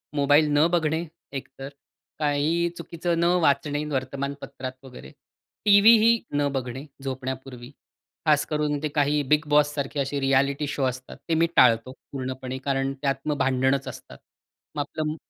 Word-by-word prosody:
Mobile 145 +2 +4
न 155 +3 +5
बघणे 165 -1 0 0.3
एकतर. 135 0 -7 0.5
काहीही 155 +3 +1
चुकीचं 170 0 -3
न 170 - +2 0.2
वाचणे 145 0 +1
वर्तमानपत्रात 135 -1 -4
वगैरे. 125 - -11 0.5
टीव्हीही 220 +3 +6 0.2
न 145 0 +2
बघणे 130 +2 -4 0.2
झोपण्यापूर्वी, 130 -1 -6 0.5
खास 150 -2 +3
करून 150 -1 -1
ते 155 - +1
काही 145 0 +2
बिग 150 +3 +2
बॉस 150 0 +3
सारखे 140 0 -3
असे 140 +1 -2
रिएलिटी 140 +2 +1
शो 140 - -2
असतात 130 0 -5
ते - - +2
मी 165 +1 +3
टाळतो 115 +2 +4 0.2
पूर्णपणे 130 -1 -5
कारण 135 -1 0
त्यात 140 -1 +1
मग 150 -2 0
भांडणच 135 0 +1
असतात. 65 - -11 0.6
मग 145 - -1
आपलं 155 +2 -3
140 Hz, 140 wpm, -25 LUFS, 135-150 Hz, 0.6 s, टीव्हीही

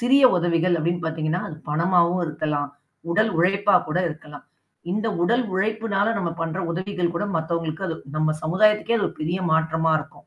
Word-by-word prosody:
சிறிய 265 +4 +4
உதவிகள் 175 0 +2
அப்டின்னு 175 +2 -1
பார்த்தீங்கனா, 160 +2 -1
அது 155 - -8
பணமாகவும் 170 +3 +2
இருக்கலாம், 150 -2 -2 0.4
உடல் 215 +5 +2
உழைப்பா 195 +4 +3
கூட 155 +4 0
இருக்கலாம். 155 -2 -10 0.5
இந்த 215 +4 -1 0.2
உடல் 240 +7 +2
உழைப்பினால 215 +1 0
நம்ம 175 -4 -1
பண்ற 165 +2 -2
உதவிகள் 180 0 -2
கூட 170 - -1
மத்தவங்களுக்கு 165 +1 -2
அது 165 - -2 0.2
நம்ம 155 0 +1
சமுதாயத்துக்கே 210 +7 +3
அது 210 - +1
ஒரு - - -12
பெரிய 165 +4 -1
மாற்றமா 160 0 +1
இருக்கும். 155 +1 -12
170 Hz, 160 wpm, -23 LUFS, 160-200 Hz, 0.5 s, சிறிய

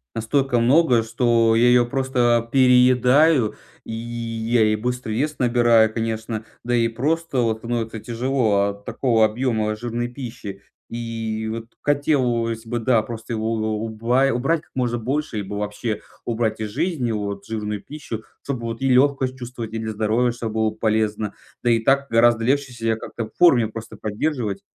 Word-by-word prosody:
Настолько 120 +2 +1
много, 125 0 +4
что 115 0 +2
я 120 +2 +4
её 120 -1 +4
просто 120 -3 +1
переедаю, 125 +1 +4 0.3
и 115 - -7
я 115 0 -1
и 110 - +2
быстро 125 +1 -3
вес 145 +7 -1
набираю, 120 -3 +4
конечно. 110 -1 -3 0.2
Да 120 +1 0
и 115 -1 +3
просто 145 +5 -1
вот 110 -2 +1
становится 115 -1 -3
тяжело 115 -3 +1
от 100 0 -9
такого 115 -4 +2
объёма 110 -1 -1
жирной 120 +2 -3
пищи. 115 -6 -8 0.3
И 115 -2 -4
вот 115 0 -5 0.2
хотелось 125 -6 0
бы, 120 - -2
да, 115 -1 +2
просто 115 +1 -7
его 110 0 -1
у 110 - -2 0.2
у - - -2
уба 115 +4 +1
убрать 135 +7 0
как - - -29
можно 120 -2 0
больше 135 +1 -2
либо 100 0 -4
вообще 105 +2 -3 0.2
убрать 110 -2 -1
из 110 - -3
жизни 145 - -1
вот 100 -2 -4
жирную 105 -2 -3
пищу, 130 -7 -7 0.2
чтобы 130 -4 -4
вот 115 0 -4
и 135 - +2
лёгкость 130 0 +3
чувствовать, 120 -2 -7
и 115 - -2
для 110 0 -3
здоровья 110 +3 +1
чтобы 115 -2 -5
было 110 0 +2
полезно. 110 -1 -1 0.3
Да 120 - +3
и 115 - +3
так 135 +4 +2
гораздо 115 0 +4
легче 135 +1 0
себя 115 -1 -1
как-то 115 +1 -6
в 110 - -14
форме 125 -10 +6
просто 110 +1 -9
поддерживать. 105 -3 -2
115 Hz, 165 wpm, -22 LUFS, 110-125 Hz, 0.3 s, форме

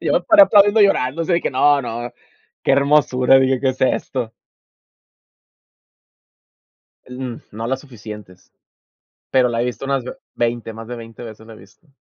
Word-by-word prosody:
Yo - - -1
me - - +2
paré, 320 -3 +6
aplaudiendo 205 -4 +5
y - - +7
llorando, 145 -2 -1
o - - -3
sea, 170 0 +1
que - - -2
no, 140 +2 +3
no. 120 +1 -6 0.5
"Que - - +1
hermosura", 135 -2 +3
dije, 130 -1 +1
"¿Qué 135 -1 +1
es 130 - -11
esto?". 125 -2 -1 2.7
En, 125 -1 -7
mm, - - -14
no 110 +2 -6
las 130 +2 -2
suficientes. 105 -8 -13 0.8
Pero 125 -2 +3
la 115 0 -2
he - - -1
visto 125 +2 -5
unas 135 -2 -1
ve 125 - -8 0.2
veinte, 120 -1 -2
más 115 0 -10
de 120 - -6
20 115 +1 -11
veces 110 -1 -11
la 115 - -12
he 110 - -14
visto. 100 - -21
125 Hz, 180 wpm, -19 LUFS, 115-140 Hz, 2.7 s, y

